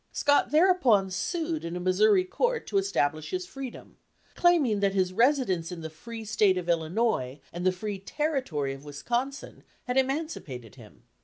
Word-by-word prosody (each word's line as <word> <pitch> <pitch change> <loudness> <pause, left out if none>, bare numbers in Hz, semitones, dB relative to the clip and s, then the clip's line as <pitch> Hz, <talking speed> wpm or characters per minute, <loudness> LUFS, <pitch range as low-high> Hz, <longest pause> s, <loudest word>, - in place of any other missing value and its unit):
Scott 285 0 +2
thereupon 300 - +4
sued 320 - -2
in 170 +1 -4
a - - -3
Missouri 185 +2 +4
court 480 - -1
to 395 - +1
establish 155 - -1
his 365 0 -3
freedom, 270 -8 -9 0.4
claiming 305 - +3
that 200 -1 +1
his 185 -1 +1
residence 230 - +2
in 175 -2 -6
the 160 -1 -6
free 225 +7 -9
state 205 -2 +3
of 180 -1 -4
Illinois 165 - 0
and 175 +2 -1
the - - +5
free 200 +2 -5
Territory 195 - -2
of 135 +1 -11
Wisconsin 240 - -4 0.2
had 250 +1 -2
emancipated 265 - -2
him. - - -16
210 Hz, 160 wpm, -28 LUFS, 175-280 Hz, 0.4 s, the